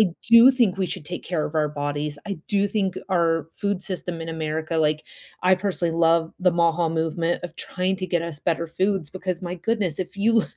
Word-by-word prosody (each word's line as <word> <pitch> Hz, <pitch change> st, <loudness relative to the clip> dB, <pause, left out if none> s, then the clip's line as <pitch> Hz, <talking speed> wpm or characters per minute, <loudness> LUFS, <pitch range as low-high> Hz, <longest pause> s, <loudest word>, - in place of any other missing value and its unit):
I 215 Hz, -, +6 dB, 0.2 s
do 235 Hz, +3 st, +9 dB
think 240 Hz, -8 st, +2 dB
we 190 Hz, -1 st, 0 dB
should 160 Hz, -, -6 dB
take 175 Hz, +4 st, -6 dB
care 165 Hz, -4 st, -1 dB
of 150 Hz, -, -9 dB
our 155 Hz, -1 st, +2 dB
bodies, 145 Hz, 0 st, -3 dB
I 200 Hz, -3 st, -4 dB
do 200 Hz, 0 st, +2 dB
think 195 Hz, -3 st, -1 dB
our 165 Hz, -4 st, +2 dB
food 200 Hz, -2 st, -2 dB
system 180 Hz, -3 st, -4 dB
in 165 Hz, -, -5 dB
America 160 Hz, 0 st, -2 dB
like, 155 Hz, -1 st, +1 dB, 0.4 s
I 185 Hz, +1 st, +6 dB
personally 180 Hz, -3 st, -1 dB
love 165 Hz, 0 st, +3 dB
the 180 Hz, 0 st, +4 dB
MAHA 170 Hz, -1 st, +2 dB
movement 165 Hz, +2 st, -1 dB
of 170 Hz, -2 st, -7 dB
trying 185 Hz, +2 st, -2 dB
to 185 Hz, -, -3 dB
get 175 Hz, -2 st, 0 dB
us 165 Hz, -3 st, -5 dB
better 170 Hz, -1 st, 0 dB
foods 185 Hz, 0 st, -1 dB
because, 185 Hz, -2 st, -4 dB
my 175 Hz, 0 st, -3 dB
goodness, 185 Hz, -3 st, -1 dB
if 185 Hz, -, -6 dB
you 225 Hz, +2 st, +3 dB
175 Hz, 210 wpm, -24 LUFS, 160-190 Hz, 0.4 s, do